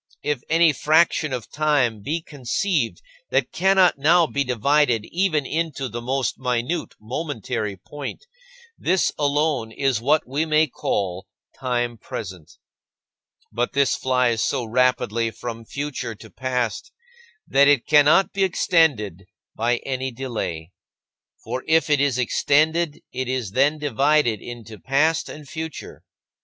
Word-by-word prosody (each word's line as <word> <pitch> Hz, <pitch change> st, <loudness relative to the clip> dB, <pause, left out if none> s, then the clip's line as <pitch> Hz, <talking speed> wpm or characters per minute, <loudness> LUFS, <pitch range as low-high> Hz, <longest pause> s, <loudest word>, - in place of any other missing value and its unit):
If 145 Hz, -4 st, -1 dB
any 165 Hz, -1 st, +4 dB
fraction 155 Hz, +1 st, +2 dB
of 120 Hz, -3 st, -5 dB
time 140 Hz, -8 st, +1 dB
be 160 Hz, +9 st, -3 dB
conceived 145 Hz, -, -2 dB, 0.3 s
that -, -, 0 dB
cannot 190 Hz, -4 st, +3 dB
now 165 Hz, +4 st, +5 dB
be 140 Hz, -2 st, -1 dB
divided 125 Hz, -2 st, +2 dB
even 170 Hz, -5 st, +1 dB
into 155 Hz, -3 st, -2 dB
the 120 Hz, -1 st, -6 dB
most 130 Hz, +1 st, -2 dB
minute 125 Hz, +6 st, -2 dB
momentary 115 Hz, -, -4 dB
point, 145 Hz, -, -8 dB, 0.5 s
this 185 Hz, 0 st, +2 dB
alone 145 Hz, -5 st, 0 dB
is 130 Hz, -2 st, 0 dB
what 150 Hz, +4 st, +2 dB
we 140 Hz, +5 st, -1 dB
may 155 Hz, 0 st, +3 dB
call 95 Hz, -, -3 dB, 0.3 s
time 120 Hz, -3 st, -2 dB
present. 90 Hz, -5 st, -8 dB, 1.0 s
But 120 Hz, +3 st, -2 dB
this 140 Hz, -1 st, +2 dB
flies 125 Hz, -3 st, +1 dB
so 130 Hz, -1 st, 0 dB
rapidly 115 Hz, -1 st, +1 dB
from 115 Hz, 0 st, -7 dB
future 135 Hz, -4 st, -4 dB
to -, -, -14 dB
past 125 Hz, -4 st, -3 dB, 0.6 s
that 140 Hz, +1 st, +5 dB
it 145 Hz, -4 st, +4 dB
cannot 150 Hz, +5 st, +5 dB
be 195 Hz, -, +1 dB
extended 140 Hz, -, +1 dB, 0.3 s
by 120 Hz, +2 st, +1 dB
any 130 Hz, -1 st, -2 dB
delay. 110 Hz, -10 st, -5 dB, 0.7 s
For 125 Hz, +3 st, -4 dB
if 160 Hz, -1 st, +3 dB
it 145 Hz, -2 st, +4 dB
is 140 Hz, -3 st, +1 dB
extended, 155 Hz, +5 st, +1 dB
it 130 Hz, 0 st, -3 dB
is 125 Hz, -6 st, -2 dB
then 140 Hz, +7 st, +2 dB
divided 145 Hz, -4 st, +1 dB
into 115 Hz, -3 st, -9 dB
past 145 Hz, +4 st, +1 dB
and 150 Hz, -1 st, -10 dB
future. 160 Hz, +1 st, -7 dB
135 Hz, 130 wpm, -23 LUFS, 120-155 Hz, 1.0 s, now